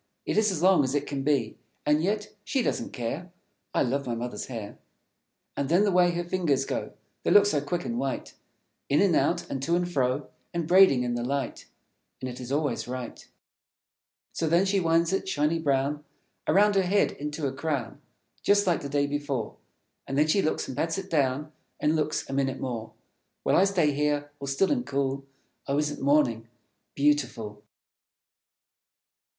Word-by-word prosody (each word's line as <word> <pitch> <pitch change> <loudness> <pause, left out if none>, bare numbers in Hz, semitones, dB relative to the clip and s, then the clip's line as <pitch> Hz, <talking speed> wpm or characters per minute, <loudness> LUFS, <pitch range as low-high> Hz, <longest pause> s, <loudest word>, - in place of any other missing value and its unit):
It - - -1
is 215 0 +4
as 175 -3 -3
long 185 -5 +6
as 130 +1 -1
it 145 0 0
can 140 -1 -3
be, 135 -5 0 0.3
And 150 +1 +3
yet 210 +4 -1
she 260 +4 0
doesn't - - -1
care. 140 +9 -4 0.4
I - - +2
love 140 +1 -1
my 120 - -1
Mother's 120 +1 -5
hair. 110 -5 -7 0.8
And 140 - -2
then 175 +5 +4
the 205 - +2
way 180 -1 +5
her 175 0 -1
fingers 170 -7 0
go; - - -4 0.3
They - - -1
look 205 0 +7
so 155 -8 +1
quick 170 +5 -3
and 235 +1 -2
white, 135 -1 -3 0.6
In 145 - +3
and 190 -5 +4
out, 170 +2 +1
and 135 - -4
to 165 +5 +1
and 175 0 0
fro, 135 -3 -1 0.2
And 170 -2 -1
braiding 180 -8 +6
in 120 -1 -1
the 120 0 -2
light; 135 0 -3 0.5
And 130 - -4
it 125 -1 -7
is 125 0 -7
always 145 -2 -1
right. 125 -1 -6 1.1
So 165 - -1
then 170 +4 +4
she 195 0 +2
winds 165 0 +2
it, 195 0 -1
shiny 155 0 +1
brown, 145 0 0 0.4
Around 205 +2 +5
her 195 - +4
head 190 +2 +2
into 150 +1 -4
a 135 - -1
crown, 140 -3 -3 0.4
Just 205 0 +3
like 175 -4 +1
the 140 - -5
day 145 0 +1
before. 145 -5 -3 0.5
And 135 - -2
then 150 - +5
she 175 +6 +3
looks, 155 - -1
and 130 - -6
pats 165 +5 -1
it 195 0 -6
down, 145 0 +1 0.3
And 150 +1 +2
looks, 155 -1 -1
a - - -6
minute 135 -1 0
more. 115 -3 -4 0.5
While - - +2
I 190 - +6
stay 175 -7 +2
here, 145 0 0
all 140 - -6
still 140 +8 +1
and 255 -4 +1
cool. 135 - -2 0.4
Oh, 140 - 0
isn't 150 0 -1
Morning 135 -6 +2 0.5
beautiful? 130 -8 0
145 Hz, 185 wpm, -27 LUFS, 135-175 Hz, 1.1 s, look